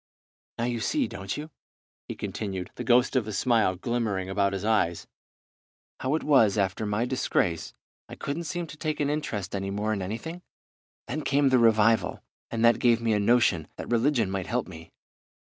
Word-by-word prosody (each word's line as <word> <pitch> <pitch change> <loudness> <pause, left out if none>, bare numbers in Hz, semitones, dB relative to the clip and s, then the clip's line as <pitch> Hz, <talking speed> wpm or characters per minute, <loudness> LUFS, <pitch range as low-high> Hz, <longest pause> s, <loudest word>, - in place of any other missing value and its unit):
"Now 115 - -2
you 120 -1 -1
see, 275 - 0
don't 95 +3 -5
you," 155 +2 -7 0.6
he - - -5
continued, 95 -4 -5
the - - -6
ghost 125 +2 +3
of 120 -5 +1
a - - -3
smile 110 -2 +2
glimmering 100 -3 -2
about 100 0 +1
his 95 +1 -3
eyes, 95 -7 +1 0.9
"how 130 +3 0
it 160 - -2
was 115 -9 +4
that 100 - +3
after 95 +3 -5
my 105 +3 0
disgrace 90 -9 -1 0.3
I - - -8
couldn't 160 +5 -4
seem 175 +2 -3
to 155 - -11
take 155 -1 -3
an 145 -1 +1
interest 110 -11 -3
any 95 0 -3
more 105 +2 -1
in 100 - -3
anything? 120 - -5 0.6
Then 155 - -3
came 140 -1 +2
the 130 -1 +4
revival, 115 -1 +3 0.3
and 115 0 0
that 115 -1 +5
gave 120 -2 +4
me 115 -1 +1
a 105 - +2
notion 100 -7 +3
that - - -7
religion 120 -3 +2
might 95 -2 -3
help 125 +2 -1
me. 80 -3 -11
115 Hz, 190 wpm, -27 LUFS, 100-130 Hz, 0.9 s, that